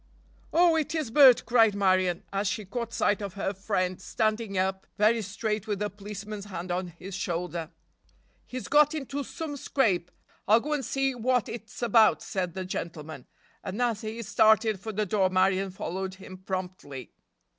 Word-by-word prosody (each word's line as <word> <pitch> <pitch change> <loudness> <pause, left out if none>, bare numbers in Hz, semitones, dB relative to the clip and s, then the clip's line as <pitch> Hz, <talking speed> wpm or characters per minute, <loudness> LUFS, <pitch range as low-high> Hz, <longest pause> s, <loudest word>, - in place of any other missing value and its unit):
"Oh, 340 -1 +5
it 310 0 -1
is 305 -8 -2
Bert," 265 -2 +7
cried 225 -4 +4
Marion, 185 -3 +2
as 195 +1 0
she 210 +1 -2
caught 230 +3 -4
sight 205 -2 +1
of 200 -2 -5
her 195 0 -2
friend, 185 -2 -2
standing 215 0 -1
up 190 +1 -1
very 220 +2 +3
straight 210 +1 -3
with 205 -2 -2
a 210 0 -2
policeman's 205 +1 -7
hand 180 -3 -6
on 180 +1 -1
his 180 +3 -10
shoulder. 175 -3 -3 0.8
"He's 255 0 -6
got 300 +1 +5
into 285 -1 -3
some 300 +2 -6
scrape. 210 -11 0 0.4
I'll 220 +3 +6
go 300 +5 -3
and 290 -2 -1
see 270 +2 0
what 250 0 +1
it's 225 +1 -8
about," 225 -1 +4
said 180 -4 -3
the 190 -1 -4
gentleman, 155 -6 -6 0.4
and 195 +5 -5
as 235 -4 0
he 225 +2 -5
started 220 0 +3
for 220 +3 -5
the 215 0 -1
door 190 -1 +2
Marion 190 +1 +2
followed 190 0 -4
him 185 -1 -11
promptly. 180 - -6
205 Hz, 170 wpm, -28 LUFS, 185-230 Hz, 0.8 s, Bert